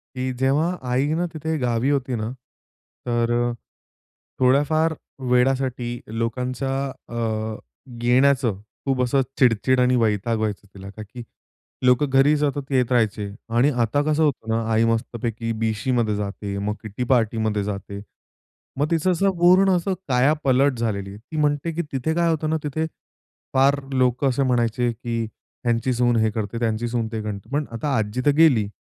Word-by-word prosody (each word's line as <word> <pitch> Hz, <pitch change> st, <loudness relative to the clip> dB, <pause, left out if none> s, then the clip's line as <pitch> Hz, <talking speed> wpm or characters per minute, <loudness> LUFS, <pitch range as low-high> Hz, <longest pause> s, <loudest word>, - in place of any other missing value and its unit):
की 130 Hz, 0 st, -2 dB
जेव्हा 150 Hz, +7 st, +2 dB, 0.2 s
आईनं 150 Hz, +7 st, +1 dB
तिथे 160 Hz, +1 st, -2 dB
गावी 125 Hz, 0 st, 0 dB
होती 130 Hz, -3 st, 0 dB
ना, 110 Hz, 0 st, -3 dB, 0.8 s
तर 120 Hz, 0 st, +1 dB, 0.9 s
थोड्या 130 Hz, +3 st, +4 dB
फार 160 Hz, +1 st, +1 dB, 0.4 s
वेळासाठी 125 Hz, -1 st, +1 dB
लोकांच्या 125 Hz, +4 st, -2 dB, 0.4 s
अ, 120 Hz, -, -7 dB, 0.9 s
येण्याचं 125 Hz, -4 st, +3 dB, 0.2 s
खूप 135 Hz, -2 st, +1 dB
असं 135 Hz, +2 st, +2 dB, 0.2 s
चिडचिड 125 Hz, +1 st, +3 dB
आणि 125 Hz, 0 st, +3 dB
वैताग 110 Hz, 0 st, +1 dB
व्हायचं 105 Hz, -1 st, -3 dB
तिला. 100 Hz, 0 st, -10 dB
का 110 Hz, +2 st, -10 dB
की 120 Hz, +3 st, -10 dB, 0.6 s
लोकं 125 Hz, +3 st, +4 dB
घरी 135 Hz, +3 st, +4 dB
सतत 145 Hz, -1 st, -2 dB
येत 125 Hz, -2 st, +2 dB
राहायचे 105 Hz, -4 st, +1 dB, 0.3 s
आणि 130 Hz, +5 st, +4 dB
आता 115 Hz, +6 st, +1 dB
कसं 155 Hz, +1 st, +1 dB
होतं 125 Hz, -6 st, -1 dB
ना, 115 Hz, +1 st, +1 dB
आई 110 Hz, +1 st, +3 dB
मस्तपैकी 115 Hz, 0 st, -2 dB
बीशीमध्ये 110 Hz, 0 st, 0 dB
जाते, 100 Hz, 0 st, -4 dB
मग 105 Hz, +1 st, -2 dB
किटी 110 Hz, +3 st, -4 dB
पार्टीमध्ये 110 Hz, -4 st, +1 dB
जाते. 100 Hz, 0 st, -5 dB, 0.8 s
मग 150 Hz, +3 st, 0 dB
तिचं 165 Hz, +3 st, +2 dB
असं 195 Hz, +3 st, +2 dB
पूर्ण 185 Hz, +2 st, +5 dB
असं 185 Hz, +3 st, -1 dB
कायापलट 135 Hz, 0 st, +2 dB
झालेली 100 Hz, -4 st, -2 dB
आहे. 100 Hz, -, -9 dB
ती 155 Hz, +8 st, -9 dB
म्हणते 150 Hz, +2 st, +1 dB
की 170 Hz, -, -1 dB
तिथे 140 Hz, +4 st, -1 dB
काय 170 Hz, -1 st, +2 dB
होतं 155 Hz, -1 st, 0 dB
ना, 160 Hz, -, +1 dB
तिथे 155 Hz, +2 st, -1 dB, 0.7 s
फार 140 Hz, +2 st, +4 dB
लोकं 130 Hz, +1 st, +2 dB
असे 135 Hz, +2 st, +1 dB
म्हणायचे 120 Hz, -1 st, +1 dB
की 115 Hz, 0 st, -3 dB, 0.4 s
ह्यांची 120 Hz, +2 st, +1 dB
सून 120 Hz, 0 st, +2 dB
हे 110 Hz, 0 st, +3 dB
करते, 110 Hz, +1 st, -4 dB
त्यांची 115 Hz, 0 st, -1 dB
सून 115 Hz, -1 st, -1 dB
ते 110 Hz, -1 st, -3 dB
करते. 100 Hz, -2 st, -6 dB
पण 150 Hz, 0 st, 0 dB
आता 135 Hz, +4 st, -2 dB
आजी 110 Hz, +3 st, -1 dB
तर 145 Hz, -, +6 dB
गेली. 130 Hz, -11 st, +5 dB
125 Hz, 155 wpm, -23 LUFS, 115-140 Hz, 0.9 s, तर